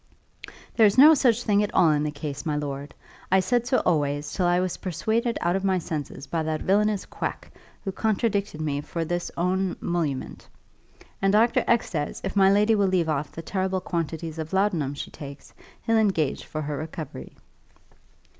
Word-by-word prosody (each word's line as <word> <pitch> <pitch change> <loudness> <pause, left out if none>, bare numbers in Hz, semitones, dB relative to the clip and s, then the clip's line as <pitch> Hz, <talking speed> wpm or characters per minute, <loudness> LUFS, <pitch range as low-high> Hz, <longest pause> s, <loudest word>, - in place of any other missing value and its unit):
There's 215 -1 +5
no 300 +4 +9
such 245 -5 +2
thing 205 -2 +3
at 210 - -1
all 170 -4 +5
in 150 -1 +1
the 150 - -1
case, 145 -1 -6
my 155 -3 -1
lord! 145 -1 -5 0.4
I 190 - +5
said 240 +5 +1
so 255 - +2
always, 145 -3 0
till 180 - +1
I 175 0 +3
was 185 -1 -2
persuaded 225 - -1
out 175 +1 +1
of 195 - -1
my 190 -1 +2
senses 155 -4 -5
by 165 +3 -2
that 155 -1 -2
villainous 205 +1 +2
quack, - - -5 0.3
who 195 - -2
contradicted 205 -4 -1
me 145 -2 -1
for 165 +2 -4
this 175 +1 -2
own 185 +1 0
'molument. 160 -6 -3 0.7
And 195 0 +3
Doctor 220 +3 +3
X 235 -1 +2
says, 150 -4 -3
if 195 - -4
my 195 -1 +5
lady 210 +2 +4
will 200 -2 +3
leave 180 -3 +1
off 145 -1 -1
the 165 - -8
terrible 190 +1 -1
quantities 165 -2 -4
of 160 +3 -5
laudanum 175 -8 +1
she - - -7
takes, 140 -1 -10 0.3
he'll 225 0 +2
engage 185 -9 0
for 155 0 -5
her 145 0 -3
recovery." 155 - -7
175 Hz, 185 wpm, -25 LUFS, 155-205 Hz, 0.7 s, no